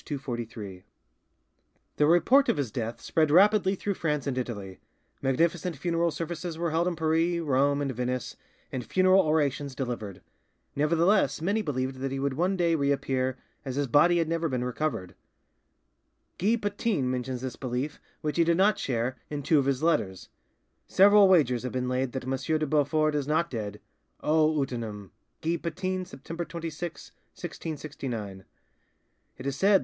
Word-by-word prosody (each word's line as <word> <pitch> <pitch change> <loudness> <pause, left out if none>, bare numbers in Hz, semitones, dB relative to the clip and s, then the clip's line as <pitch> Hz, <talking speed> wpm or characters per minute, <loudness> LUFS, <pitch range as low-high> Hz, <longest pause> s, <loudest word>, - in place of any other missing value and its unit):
P. - - -32
243) 115 -8 -6 1.1
The 150 - +4
report 255 - +5
of - - +2
his 135 -6 -2
death 115 -2 -4
spread 155 -2 +1
rapidly 195 +3 +5
through 205 +1 -2
France 150 -6 -1
and 140 -3 -1
Italy; 100 -7 -5 0.4
magnificent 165 +5 +1
funeral 170 +2 +1
services 165 +1 -4
were 170 -1 -1
held 165 +2 +1
in 180 - -1
Paris, 165 +2 +1
Rome, 140 -1 +2
and 135 - -1
Venice, 125 0 -3 0.4
and 125 - -3
funeral 185 +6 +4
orations 145 -4 0
delivered. 120 -7 -5 0.5
Nevertheless, 165 +1 +3
many 200 +7 0
believed 130 -6 -2
that 135 0 -2
he 135 - -2
would 140 0 -1
one 180 +7 0
day 170 -2 +2
reappear, 135 -3 0 0.3
as 130 -2 -4
his 145 0 +1
body 155 +7 +4
had 165 -2 +1
never 165 0 -1
been 125 -2 -1
recovered. 125 -7 -3 1.3
Guy 210 +6 +3
Patin 205 - -1
mentions 125 0 -3
this 130 -2 -4
belief, 130 +3 -3 0.2
which 150 0 -2
he 170 - +5
did 170 0 +2
not 200 +2 +3
share, 125 0 -1
in 145 -1 -4
two 155 +1 +4
of 135 - 0
his 135 +1 0
letters:— 95 - 0 0.6
"Several 205 +1 +6
wagers 140 -10 +4
have 125 - -5
been 125 0 -1
laid 125 0 -1
that 130 - -3
M. 135 +5 -1
de 155 - 0
Beaufort 155 +1 +2
is 145 -2 -1
not 160 +3 +1
dead! 105 -3 -4 0.4
'O 155 0 +3
utinam'!" 110 -7 -4 0.3
(Guy 170 +1 0
Patin, 185 +2 -3
September 165 +3 -6
26, 170 0 -6 0.2
1669). 125 - -6 0.9
"It 130 - -9
is 140 -1 -1
said 195 +9 +2
that 205 - +6
M. - - +6
145 Hz, 165 wpm, -28 LUFS, 130-170 Hz, 1.3 s, Several